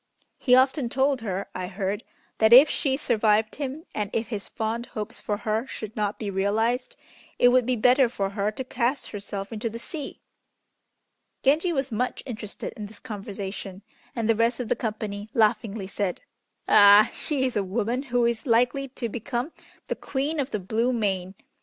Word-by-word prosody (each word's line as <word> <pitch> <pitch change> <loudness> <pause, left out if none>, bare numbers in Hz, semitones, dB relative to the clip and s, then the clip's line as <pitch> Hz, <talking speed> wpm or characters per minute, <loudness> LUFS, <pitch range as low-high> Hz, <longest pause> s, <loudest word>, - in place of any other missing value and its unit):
He 250 - +5
often 260 0 +3
told 270 0 +1
her, 195 -3 -3
I 185 0 -4
heard, 195 +1 -3 0.4
that 220 0 +5
if 260 +5 +10
she 270 -4 0
survived 220 -5 +2
him, 280 +4 -4
and 210 -2 -2
if 225 0 -1
his 210 -4 -4
fond 230 +1 -3
hopes 210 -2 -5
for 205 - -2
her 220 +3 -1
should 215 -3 -7
not 210 -1 -1
be 205 -3 -4
realized, 220 +6 0 0.4
it 245 - +6
would 250 -1 +3
be 255 - +2
better 250 +2 +4
for 195 -4 -2
her 200 +1 0
to 215 +5 -5
cast 255 +2 -1
herself 200 0 -6
into 225 +1 -2
the 225 - -7
sea." 285 +4 -7 1.2
Genji 310 +6 +3
was 270 -4 -1
much 250 +3 -2
interested 220 -5 -6
in 210 -1 -6
this 210 +1 -14
conversation, 200 -3 -6 0.3
and 230 -3 -1
the 230 - +5
rest 230 +2 +1
of 240 -3 -4
the - - +2
company 215 -2 -4
laughingly 215 -2 +1
said, 195 -1 -3 0.4
"Ah! 205 +1 +8
she 280 -4 -1
is 255 - -2
a 205 - +2
woman 230 +6 -1
who 245 -3 +1
is 235 +3 -1
likely 245 +4 +2
to 250 -2 -5
become 240 +5 -3 0.4
the - - -1
Queen 290 +3 -2
of 275 -1 -1
the 215 - -2
Blue 225 +6 0
Main. 195 -5 -1
225 Hz, 180 wpm, -26 LUFS, 205-255 Hz, 1.2 s, if